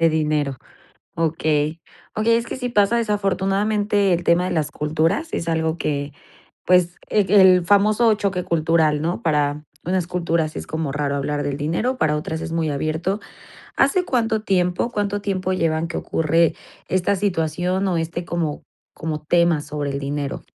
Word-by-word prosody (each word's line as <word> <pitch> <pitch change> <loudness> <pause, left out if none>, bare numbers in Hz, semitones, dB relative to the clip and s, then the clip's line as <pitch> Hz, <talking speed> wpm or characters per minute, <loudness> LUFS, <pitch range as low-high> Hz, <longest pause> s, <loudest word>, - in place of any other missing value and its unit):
De 165 - +5
dinero. 150 -3 0 0.6
Okey. 155 -1 0 0.3
Okey, 230 +2 +3
es 235 0 0
que - - -5
sí 250 -1 -3
pasa 210 +1 +3
desafortunadamente, 205 -1 +1
el 175 - -1
tema 170 +2 +3
de - - -2
las 155 -3 -1
culturas 160 - 0
es 165 - -3
algo 160 0 0
que, 145 -2 -2 0.5
pues, 180 -1 +3
el, 205 -4 +2
el 185 -3 +6
famoso 210 +3 +4
choque 195 -3 -1
cultural, 160 -2 +2
¿no? 170 +3 -2
Para 150 -2 0 0.2
unas 180 -1 0
culturas 170 -3 -1
es - - -6
como 160 -3 -3
raro 145 -1 -1
hablar 145 +1 -2
del 140 -1 -2
dinero, 175 - -1
para 150 -1 +1
otras 160 +1 -4
es 165 0 -5
muy 165 -2 0
abierto. 155 +7 -1 0.6
¿Hace 370 -2 +3
cuánto 225 -4 0
tiempo, 180 +2 +1
cuánto 205 -1 -1
tiempo 185 -2 -1
llevan 165 -2 0
que 170 - -5
ocurre 165 +1 +1 0.3
esta 185 +2 +1
situación 180 0 -1
o 175 -2 0
este 165 +1 -3
como 165 -4 -3 0.3
como 155 -1 -4
tema 170 -1 +3
sobre 145 -1 -4
el 140 - -3
dinero? 140 0 -4
170 Hz, 165 wpm, -21 LUFS, 155-195 Hz, 0.6 s, el